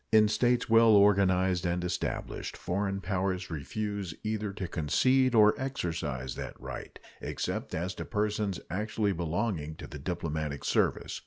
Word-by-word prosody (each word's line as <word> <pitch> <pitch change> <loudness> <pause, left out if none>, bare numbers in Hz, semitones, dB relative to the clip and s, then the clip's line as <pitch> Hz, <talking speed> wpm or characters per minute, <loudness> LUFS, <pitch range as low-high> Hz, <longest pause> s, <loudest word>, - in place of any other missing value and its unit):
In 110 -1 +6
states 120 +3 +2
well 115 -1 +6
organized 95 -3 +4
and 90 0 0
established, 90 - -3
foreign 100 +1 -2
powers 95 -1 -1
refuse 100 +4 -4
either 110 -1 -2
to 100 -2 -5
concede 130 - +2
or 105 -1 +7
exercise 80 - -3
that - - -7
right, - - -7 0.2
except - - -3
as 90 +3 -2
to - - -6
persons 105 -3 -1
actually 105 +1 0
belonging 85 -2 -2
to - - -9
the 75 - -8
diplomatic 80 -3 -3
service. - - +1
95 Hz, 140 wpm, -30 LUFS, 85-105 Hz, 0.2 s, or